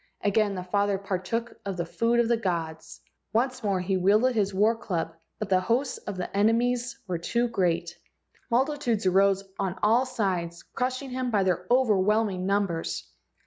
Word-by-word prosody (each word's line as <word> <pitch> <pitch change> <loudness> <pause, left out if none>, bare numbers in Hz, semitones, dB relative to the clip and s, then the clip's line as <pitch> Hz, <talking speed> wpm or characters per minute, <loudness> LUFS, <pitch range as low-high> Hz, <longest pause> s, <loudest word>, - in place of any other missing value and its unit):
Again 205 0 +2
the 180 - -4
father 200 +2 +1
partook 200 +4 -3
of 195 -2 -4
the 170 - -1
food 230 +7 +1
of 235 - +3
the 235 - +3
gods. 165 -6 -4 0.3
Once 255 +2 0
more 200 -3 +1
he 190 +1 0
wielded 210 +7 +3
his 205 -3 +1
war 210 +4 +3
club, 170 -7 -3 0.2
but 215 - -3
the 185 -1 +4
hosts 240 +7 0
of 205 - -6
20 - - -10
LEGENDS 180 - -2
OF - - -20
GHOSTS 200 - -2
enemies 240 +3 +1
were 180 -2 -1
too 235 +8 0
great. 175 -6 -1 0.5
Multitudes 250 -4 +1
arose 195 +1 +3 0.2
on 190 -2 -2
all 235 +5 +4
sides, 180 -7 -2
crushing 255 +2 -2
him 255 0 -2
by 205 -4 +2
their 180 -1 0
overwhelming 210 -5 +2
numbers. 195 -5 -1
205 Hz, 180 wpm, -27 LUFS, 185-235 Hz, 0.5 s, the